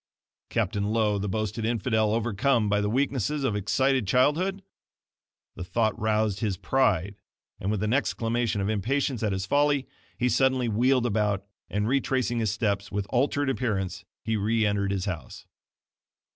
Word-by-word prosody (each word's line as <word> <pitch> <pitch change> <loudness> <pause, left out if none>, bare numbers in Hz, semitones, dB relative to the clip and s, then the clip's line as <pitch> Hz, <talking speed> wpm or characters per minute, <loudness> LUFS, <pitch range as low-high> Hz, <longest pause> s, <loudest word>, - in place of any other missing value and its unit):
Captain 100 0 -1
Lowe, 105 -1 +1
the 100 +1 -2
boasted 110 +2 -2
infidel 110 -1 +1
overcome 115 +1 +1
by 105 0 +2
the 105 - 0
weakness 130 0 0
of 140 -7 -1
excited 130 +3 +1
childhood! 165 - +2 0.9
The - - -6
thought 110 +4 0
roused 110 -2 +1
his 100 -4 -1
PRIDE 100 -4 +1 0.4
and 95 - -2
with 105 -1 -1
an 110 +2 +1
exclamation 120 -5 0
of 100 - -1
impatience 120 +4 0
at 110 -2 0
his 95 0 -2
folly, 145 +3 +2 0.3
he 125 - +1
suddenly 130 -1 +2
wheeled 125 +3 +2
about, 105 -3 0 0.2
and 105 +1 -1
retracing 130 -2 0
his 110 -2 +1
steps, 100 -2 -1
with 100 -1 -2
altered 140 +3 +1
appearance, 110 -8 -2 0.2
he 110 0 0
re 110 +2 +1
entered 100 -1 0
his 95 -1 -1
house. 85 -9 -6
110 Hz, 155 wpm, -27 LUFS, 100-130 Hz, 0.9 s, by